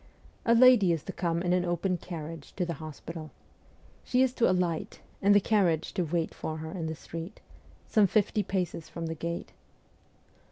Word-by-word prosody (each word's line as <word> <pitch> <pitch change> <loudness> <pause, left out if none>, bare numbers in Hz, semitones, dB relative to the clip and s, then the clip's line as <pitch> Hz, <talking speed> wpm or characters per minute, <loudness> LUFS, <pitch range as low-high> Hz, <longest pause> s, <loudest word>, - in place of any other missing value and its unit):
' - - -29
A - - +7
lady 240 -7 +7
is 165 -2 -1
to - - -6
come 170 -1 -1
in 175 -1 +2
an 180 0 +2
open 180 +1 0
carriage 165 -3 -7
to 180 - 0
the 170 - -3
hospital. 155 +1 -7 0.7
She 255 +1 +3
is 260 -1 +1
to 240 -5 +3
alight, 180 -3 -1 0.2
and 205 +1 +5
the - - +8
carriage 185 -6 +1
to - - 0
wait 165 0 -1
for 155 0 -5
her 160 0 -6
in 170 -4 -4
the 160 - -3
street, 165 +5 -8 0.5
some 215 -3 +4
fifty 210 +2 +2
paces 180 -4 -3
from 170 - -5
the 160 - -2
gate. 170 +2 -5
175 Hz, 190 wpm, -29 LUFS, 165-195 Hz, 0.7 s, the